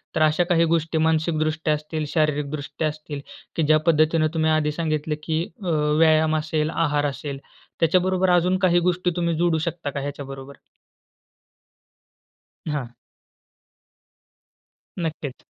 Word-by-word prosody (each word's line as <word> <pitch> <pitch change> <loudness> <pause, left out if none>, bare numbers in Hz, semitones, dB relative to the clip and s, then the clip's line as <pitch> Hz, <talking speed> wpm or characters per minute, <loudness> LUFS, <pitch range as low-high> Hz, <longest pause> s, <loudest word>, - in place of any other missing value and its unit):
तर - - +1
अशा 155 +3 +4
काही 170 -1 +4
गोष्टी 160 0 0
मानसिकदृष्ट्या 160 0 +1
असतील, 155 +1 -3
शारीरिकदृष्ट्या 150 -1 -1
असतील, 150 -1 -6 0.3
की 165 - +1
ज्या 155 +1 +5
पद्धतीने 155 0 +3
तुम्ही 160 -1 +2
आधी 155 -1 +2
सांगितलं, 155 -1 -2
की 160 0 0 0.2
अ, 180 - -2 0.3
व्यायाम 155 -1 +4
असेल, 155 0 -1
आहार 150 -3 0
असेल. 140 0 -4 0.4
त्याच्याबरोबर 185 +2 +2
अजून 180 +1 +3
काही 175 -1 +4
गोष्टी 180 0 0
तुम्ही 170 -1 0
जोडू 170 -1 +2
शकता 165 -1 -3
का 140 - -4
ह्याच्याबरोबर? 140 -1 -7 2.1
हां. 145 -6 -2 2.1
नक्कीच. 155 -6 -4
155 Hz, 120 wpm, -23 LUFS, 150-165 Hz, 2.1 s, ज्या